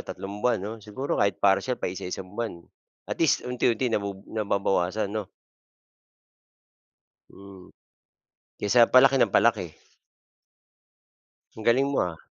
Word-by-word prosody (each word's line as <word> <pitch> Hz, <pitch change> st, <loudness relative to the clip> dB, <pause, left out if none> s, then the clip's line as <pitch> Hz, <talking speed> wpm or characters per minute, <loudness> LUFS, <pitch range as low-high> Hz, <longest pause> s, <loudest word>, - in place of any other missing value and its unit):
tatlong 100 Hz, +2 st, -7 dB
buwan 125 Hz, +2 st, +2 dB
'no, 100 Hz, +3 st, -5 dB
siguro 105 Hz, +7 st, -3 dB
kahit 100 Hz, -1 st, +2 dB
parcial, 100 Hz, +6 st, +2 dB
paisa-isang 90 Hz, +1 st, -5 dB
buwan 105 Hz, -6 st, -5 dB, 0.4 s
at -, -, -5 dB
least 165 Hz, -4 st, +2 dB
unti-unti 125 Hz, -1 st, 0 dB
nabubu 100 Hz, -2 st, -3 dB
nababawasan 100 Hz, -1 st, -1 dB
'no. 105 Hz, -3 st, -4 dB, 2.0 s
Mm. 100 Hz, -2 st, -14 dB, 0.9 s
Kaysa 115 Hz, +3 st, +5 dB
palaki 135 Hz, +1 st, +6 dB
ng -, -, +3 dB
palaki. -, -, +2 dB, 1.8 s
Ang 110 Hz, -, -9 dB
galing 120 Hz, +5 st, +3 dB
mo 140 Hz, 0 st, -1 dB
ha. 85 Hz, -2 st, -4 dB
105 Hz, 110 wpm, -26 LUFS, 95-120 Hz, 2.0 s, palaki